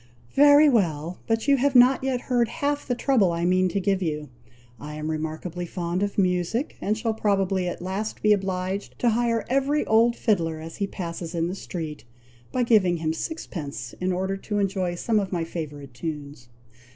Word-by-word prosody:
"Very 290 +1 +7
well! 175 - +1
but 225 +2 0
you 280 -1 +5
have 275 +1 +1
not 250 +2 +6
yet 260 -2 0
heard 245 -2 +1
half 290 +3 -2
the 245 - 0
trouble 240 -8 +3
I 170 0 -1
mean 185 +1 +3
to 200 - -1
give 195 0 0
you. 150 -4 -3 0.5
I 150 +1 -7
am 155 +1 -3
remarkably 160 +3 -4
fond 175 +1 -3
of 205 0 -2
music, 185 - 0
and 215 +2 0
shall 225 0 -1
probably 195 -3 +1
at 175 - -5
last 195 +4 -4
be 210 0 +6
obliged 190 0 -2
to 240 - +2
hire 230 -1 +1
every 275 +3 +1
old 230 +2 +4
fiddler 165 -10 0
as 160 +1 -8
he 200 - -1
passes 170 -2 -6
in 165 0 0
the - - -3
street, 160 -5 -6 0.5
by 255 - +1
giving 200 -7 +4
him 160 -1 -1
sixpence 165 - -5
in 185 +1 +1
order 190 +2 -1
to 205 +1 -4
enjoy 190 -3 0
some 215 +5 +1
of 195 -2 -3
my 175 -3 -1
favourite 150 -5 -6
tunes." 145 -2 -6
190 Hz, 190 wpm, -25 LUFS, 170-230 Hz, 0.5 s, Very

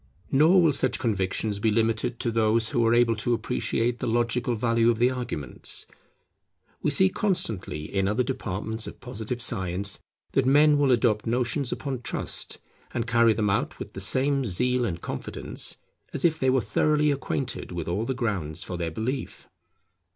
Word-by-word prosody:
Nor 165 +7 +5
will 160 - +5
such 140 - +1
convictions 100 -1 -1
be 110 - +2
limited 115 +2 0
to 115 - 0
those 110 0 +2
who 120 - +1
are 115 - +4
able 120 -1 +4
to 120 +3 +1
appreciate 115 +1 -1
the 125 - -2
logical 120 +1 0
value 115 +1 +2
of 115 - +2
the 120 +2 +3
arguments. 120 - -4 1.0
We - - +1
see - - +5
constantly 110 - -1
in 95 +4 -1
other 105 +5 +1
departments 110 -2 -3
of - - -9
Positive 120 -1 -5
science 100 -4 -1 0.3
that 135 -1 +2
men 145 +2 +5
will 140 -2 +3
adopt 115 -3 +2
notions 125 +3 0
upon 135 -4 -4
trust, - - -4 0.4
and 115 - 0
carry 115 -1 +4
them 105 -1 0
out - - -1
with - - -8
the - - -6
same 135 +1 +2
zeal 125 +4 +1
and 85 -7 -3
confidence, - - -5 0.4
as - - 0
if 160 -2 +2
they 130 - +2
were 130 0 +3
thoroughly 150 +8 +2
acquainted 135 -4 -3
with 85 -2 -4
all 95 +6 -1
the 130 - -2
grounds 90 - -2
for 90 - -5
their 85 -1 -2
belief. 125 - -4
115 Hz, 175 wpm, -26 LUFS, 105-130 Hz, 1.0 s, Nor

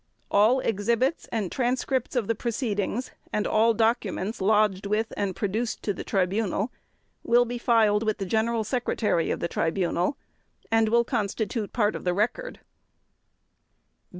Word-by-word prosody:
All 225 +6 +4
exhibits 235 - 0
and 215 -6 -2
transcripts 255 +1 -1
of 245 -4 +1
the 230 - +2
proceedings 230 0 -2 0.2
and 210 - 0
all 225 +1 +3
documents 220 -2 0
lodged 205 -1 +2
with 215 +2 -1
and 195 -2 -2
produced 220 +3 -2
to 205 - 0
the - - -6
Tribunal 200 +3 0 0.5
will 240 +1 +4
be 240 0 -4
filed 220 -3 +3
with 215 -1 0
the 195 - -3
General 220 +3 0
Secretary 220 -6 0
of - - -2
the 170 - 0
Tribunal 175 - 0 0.5
and 225 -1 +3
will 235 +1 +4
constitute 220 -2 -2
part 210 -3 +1
of - - -6
the 180 -1 0
Record. 245 - -2
220 Hz, 145 wpm, -26 LUFS, 200-235 Hz, 0.5 s, All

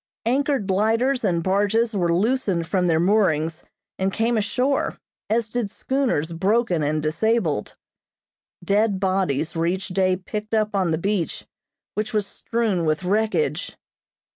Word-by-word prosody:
Anchored 270 -2 +1
lighters 225 +7 +1
and 170 -5 +1
barges 205 +4 +1
were 175 -3 +1
loosened 195 -2 +1
from 180 +2 0
their 160 -2 +3
moorings 165 -4 +1 0.4
and 190 +1 +1
came 230 +4 +1
ashore, 250 +6 0 0.3
as 230 0 +1
did 230 -2 -2
schooners 245 - -1
broken 190 +1 +1
and 150 +1 0
disabled. 165 - 0 0.9
Dead 200 +1 +2
bodies 185 -6 0
were 165 +1 +1
each 190 +3 -2
day 185 0 +2
picked 210 +4 -4
up 215 -1 +1
on 190 -3 +1
the 160 - +1
beach, 195 -1 -2 0.5
which 215 +3 -3
was 210 -2 +1
strewn 215 -4 -1
with 155 +2 0
wreckage. 220 - 0
200 Hz, 140 wpm, -23 LUFS, 170-225 Hz, 0.9 s, their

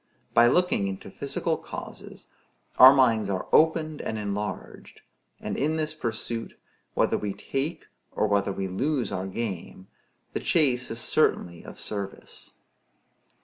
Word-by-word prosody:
By 120 +1 +6
looking 175 - +2
into 95 -1 -6
physical - - -2
causes - - -9 0.5
our 130 +1 +12
minds 115 -7 +3
are 95 -2 -2
opened 155 -1 +3
and 110 - -3
enlarged; 105 0 -5 0.4
and - - -4
in 155 +3 0
this 155 -1 -1
pursuit, 115 -4 -4 0.4
whether - - +2
we 100 -1 -3
take 140 - -4 0.3
or - - 0
whether 100 -1 +1
we 95 0 -3
lose 130 +7 -1
our 95 +1 -3
game, 95 -3 -5 0.4
the - - -1
chase 130 -6 +2
is 115 - -3
certainly 85 -6 +1
of - - -10
service. 100 -2 -5
115 Hz, 135 wpm, -26 LUFS, 100-140 Hz, 0.5 s, our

